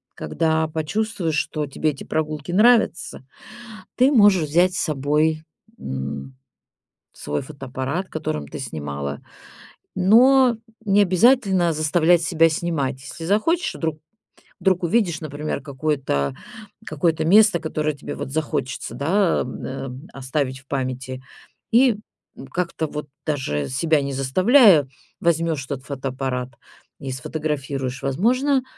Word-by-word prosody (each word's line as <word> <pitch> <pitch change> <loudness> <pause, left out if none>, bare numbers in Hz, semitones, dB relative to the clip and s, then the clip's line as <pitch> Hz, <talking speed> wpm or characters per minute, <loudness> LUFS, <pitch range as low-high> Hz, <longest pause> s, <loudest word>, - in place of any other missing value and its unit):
когда 160 -1 0
почувствуешь, 165 +2 -2
что 155 -1 -1
тебе 155 +3 -1
эти 140 - -10
прогулки 155 0 -3
нравятся, 215 - +3 0.7
ты 260 +3 +4
можешь 205 - +5
взять 180 +4 +3
с 210 - -1
собой, 155 +2 0 0.4
м, 65 0 -6 0.8
свой 75 0 -4
фотоаппарат, 140 +5 -5
которым 75 - -4
ты - - -8
снимала. 70 - -5 0.7
Но 240 +6 +5 0.3
не 205 0 +4
обязательно 190 -3 +3
заставлять 165 +2 +3
себя 165 -1 +3
снимать. 145 -5 -2
Если 145 +4 -9
захочешь, 270 - +1
вдруг, 160 -2 -3 0.6
вдруг 185 -2 +1
увидишь, 175 -3 +1
например, 150 0 -4
какое-то, 135 - -2 0.5
какое-то 160 0 0
место, 205 0 +5
которое 155 -1 -2
тебе 145 - -7
вот 135 - -6
захочется, 145 -3 -3
да, 175 +6 +1
м, 125 - -6
эм, 135 +2 -7
оставить 130 0 -3
в 135 - -24
памяти, 130 -1 -4 0.5
и, 240 -1 +5 0.4
м, 135 - -10
как-то 170 +1 -2
вот 150 0 -6 0.2
даже 130 - -2
себя 155 +3 +1
не 140 0 -3
заставляя, 175 - +5 0.3
возьмешь 165 -3 +1
тот 135 -2 -5
фотоаппарат 130 -2 -4 0.5
и 135 -1 -5
сфотографируешь. 135 -1 -3
Возможно, 255 - +1
155 Hz, 120 wpm, -22 LUFS, 135-180 Hz, 0.8 s, можешь